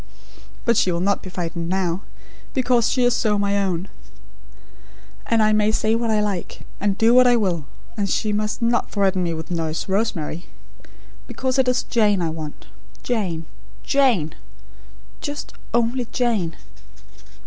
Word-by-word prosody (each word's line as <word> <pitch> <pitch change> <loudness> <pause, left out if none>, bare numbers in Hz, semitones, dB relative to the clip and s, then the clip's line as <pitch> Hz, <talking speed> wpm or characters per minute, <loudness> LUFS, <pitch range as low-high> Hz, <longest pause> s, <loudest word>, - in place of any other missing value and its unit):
But 235 -2 +3
she 185 - +3
will 170 - -1
not 200 +3 +1
be 185 - -8
frightened 170 -2 -4
now, 185 -1 0 0.5
because 245 -3 +3
she 255 - +2
is 245 0 +4
so 210 -2 +1
my 200 0 +1
own; 185 -1 -1 1.4
and 225 -1 +3
I 215 0 +4
may 215 0 +3
say 220 0 +1
what 230 0 0
I 215 -1 +3
like; 200 -4 -3 0.2
and 200 -1 0
do 225 +1 +5
what 255 0 +7
I 245 - +5
will; 180 -9 0 0.3
and 200 -2 -1
she 215 +2 0
must 210 +3 -1
not 235 +1 +1
threaten 195 -2 +1
me 170 -2 -1
with 160 +1 -7
Nurse 165 -2 -2
Rosemary; 190 -5 -1 0.8
because 260 0 -1
it 260 - +3
is 250 0 +2
Jane 210 -4 +2
I 165 -2 0
want 155 -2 -7 0.4
Jane, 185 -9 -1 0.4
Jane; 245 - +2 0.9
just 290 -1 -5 0.2
ONLY 235 +1 +1
Jane! 215 -10 0
205 Hz, 155 wpm, -22 LUFS, 175-235 Hz, 1.4 s, what